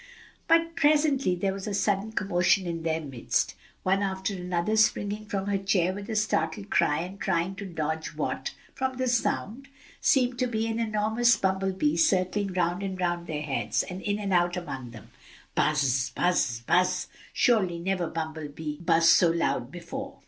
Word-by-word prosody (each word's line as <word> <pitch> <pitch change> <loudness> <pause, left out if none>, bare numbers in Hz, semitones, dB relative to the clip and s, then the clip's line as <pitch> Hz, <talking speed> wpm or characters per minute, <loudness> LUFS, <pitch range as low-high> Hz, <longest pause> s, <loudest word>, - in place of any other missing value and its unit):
But 330 0 +3
presently 290 - +3
there 190 +2 -1
was 195 +1 -6
a 205 - -2
sudden 205 +2 0
commotion 185 -1 +2
in 170 -1 -3
their 160 0 0
midst, 135 -6 -1 0.3
one 190 +2 +2
after 195 0 -2
another 180 +2 -1
springing 215 -1 +1
from 195 -1 -2
her 200 -1 0
chair 185 -2 +1
with 200 +1 -7
a - - -14
little 220 - -2
startled 200 -2 -1
cry 150 +2 +2
and 185 +3 -7
trying 185 -1 0
to 200 -1 -6
dodge 160 -2 -3
what, - - -3 0.2
from 260 -1 -2
the 255 0 0
sound, 240 +1 -1 0.3
seemed 250 -3 +2
to 255 - +2
be 225 -2 -1
an 225 0 -2
enormous 220 +1 +2
bumble 190 -1 0
bee 160 -4 +1
circling 185 +3 +1
round 175 +1 0
and 190 -1 -4
round 175 -1 -1
their 150 -2 -3
heads 140 -3 -1
and 185 +1 -7
in 205 0 -1
and 200 -2 -2
out 175 0 +2
among 135 -8 -6
them. 115 -3 -13 0.4
"Buzz! 135 -4 +1
buzz! 120 -10 +1
buzz!" 180 +6 +2 0.2
surely 195 -8 +2
never 180 0 -1
bumble 160 -1 -4
bee 150 +1 -6
buzzed 165 -1 +3
so 170 - +6
loud 165 -6 0
before. 225 - -7
190 Hz, 180 wpm, -27 LUFS, 165-210 Hz, 0.4 s, so